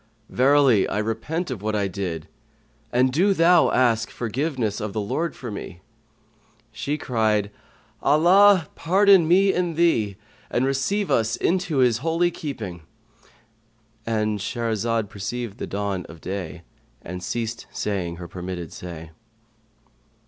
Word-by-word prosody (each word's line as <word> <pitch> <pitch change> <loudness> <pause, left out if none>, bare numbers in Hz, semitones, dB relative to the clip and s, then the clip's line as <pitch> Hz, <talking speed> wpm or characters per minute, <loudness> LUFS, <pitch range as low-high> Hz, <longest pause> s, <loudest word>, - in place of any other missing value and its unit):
Verily, 135 -5 +4
I - - -2
repent 115 +10 -2
of 115 -6 -5
what 110 +1 -1
I 100 -1 +1
did, 90 -5 -4 0.6
and 125 +1 +2
do 195 +6 +3
thou 170 0 +5
ask 115 -3 +2
forgiveness 120 -2 -2
of 105 -2 -4
the 110 - -2
Lord 130 +11 -2
for 120 -4 -7
me." 95 -3 -8 0.9
She 140 +7 -3
cried, 110 -6 0 0.5
"Allah 175 +4 +5
pardon 190 0 +4
me 190 +3 +4
and 175 -2 -1
thee, 115 - +2 0.3
and 125 - +1
receive 160 +10 0
us 115 0 +2
into 180 -4 0
his 125 -3 +3
holy 165 +4 +1
keeping."—And 115 - -7
Shahrazad 115 +1 -1
perceived 110 +3 -5
the - - -4
dawn 100 -2 -3
of 85 - -11
day 90 -3 -6 0.4
and 90 +1 -6
ceased 115 +4 -4
saying 90 -5 -3
her 85 0 -8
permitted 90 -2 -6
say. 80 -3 -9
115 Hz, 125 wpm, -23 LUFS, 100-150 Hz, 0.9 s, thou